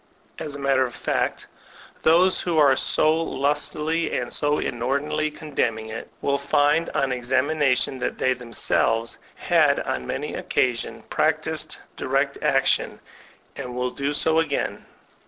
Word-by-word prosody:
As 150 -2 -5
a - - -5
matter 135 -1 +2
of 120 - -11
fact, - - -1 0.6
those 180 +4 +4
who 170 -3 -1
are 140 -3 +6
so 155 +4 +2
lustily 150 +3 -1
and 125 - -4
so 145 0 +1
inordinately 145 +6 -1
condemning 120 -8 -2
it, 110 - -7
will 140 0 +1
find 145 +3 +2
on 135 -1 +1
examination 130 +1 +1
that - - -2
they 130 - +2
themselves 115 -1 +1 0.2
have - - +3
on 65 -1 -3
many - - -3
occasions 125 -2 -1
practised - - 0 0.2
direct - - -1
action, - - +2 0.6
and 125 -3 -6
will 125 0 -1
do 140 +2 -2
so 160 +2 +2
again. 155 -4 -2
140 Hz, 135 wpm, -24 LUFS, 125-155 Hz, 0.6 s, are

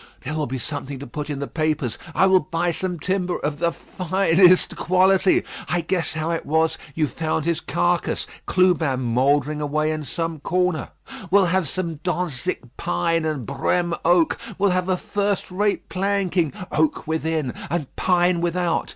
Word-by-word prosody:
There 150 - -5
will 155 -1 -1
be 130 +2 -3
something 140 +2 -5
to 140 - -8
put 150 +4 -6
in 145 - -3
the 140 - -3
papers. 155 -6 -1 0.2
I - - +5
will 190 -1 +5
buy 170 +2 -1
some 180 +1 -2
timber 185 0 -1
of 145 0 -3
the 170 0 +2
finest 185 0 +3
quality. 185 +1 +3 0.3
I 175 - +1
guess 170 +1 -1
how 155 +1 -1
it 165 - -2
was; 160 +1 +1 0.2
you 155 - +2
found 155 +3 -2
his 170 -1 0
carcase; 175 0 0 0.2
Clubin 170 -8 +2
mouldering 140 +5 +1
away 155 +1 0
in 155 -1 -3
some 165 +4 -3
corner. 180 +2 0 0.4
We'll 195 +1 +5
have 180 -1 +1
some 170 0 -2
Dantzic 180 -1 -2
pine 160 - 0
and 150 -6 -2
Brême 170 +6 0
oak; 175 -2 +3 0.2
we'll 195 0 +3
have 180 0 0
a 185 - +2
first 200 0 -1
rate 205 +2 0
planking 190 -4 0 0.2
oak 155 +1 +1
within 160 -4 -1 0.2
and 155 -3 -3
pine 175 -1 +2
without. 175 0 0
165 Hz, 165 wpm, -23 LUFS, 150-180 Hz, 0.4 s, I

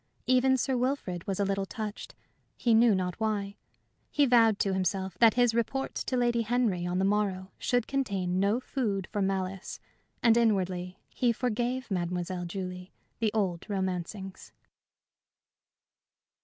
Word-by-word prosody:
Even 255 +1 +4
Sir 265 +1 0
Wilfrid 245 -9 -2
was 195 -1 -2
a 200 - +2
little 195 0 -1
touched, 215 0 -6 0.4
he 235 - +2
knew 225 -1 +6
not 180 +1 -2
why; 205 -2 -2 0.5
he 290 - +3
vowed 230 -4 +5
to 195 -1 0
himself 190 0 -1
that 230 -2 +6
his 245 -2 +3
report 250 +4 -1
to 255 - -2
Lady 240 -1 +2
Henry 220 -6 0
on 175 +1 -1
the 190 - +2
morrow 195 -2 0
should 245 -2 +1
contain 195 -10 -1
no 200 +5 +2
food 215 -8 -2
for 205 - -1
malice, 190 -1 -2 0.4
and 230 -1 +5
inwardly 185 -5 0 0.2
he 245 -2 +2
forgave 245 +1 -2
Mademoiselle 180 0 -2
Julie 180 0 -6 0.3
the 220 -2 +1
old 190 -4 -1
romancings. 190 0 -4
200 Hz, 140 wpm, -29 LUFS, 185-235 Hz, 0.5 s, knew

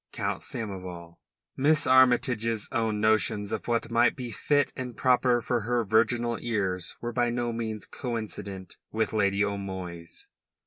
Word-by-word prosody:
COUNT - - -2
SAMOVAL 90 -6 -6 0.4
Miss 150 +3 +3
Armytage's 125 -4 +3
own 110 -2 0
notions 105 -1 +2
of - - -4
what 115 -1 0
might 120 +1 +4
be 125 -3 -6
fit 145 +6 +1
and 125 -2 -6
proper 125 -1 +3
for 120 -2 0
her 120 +1 0
virginal 115 +2 +2
ears 95 -6 -1
were 120 0 -4
by 120 0 +2
no 120 0 -1
means 110 -2 -4
coincident 110 -6 -6
with 110 0 -1
Lady 100 -1 +2
O'Moy's. 95 -4 -6
115 Hz, 140 wpm, -27 LUFS, 100-120 Hz, 0.4 s, might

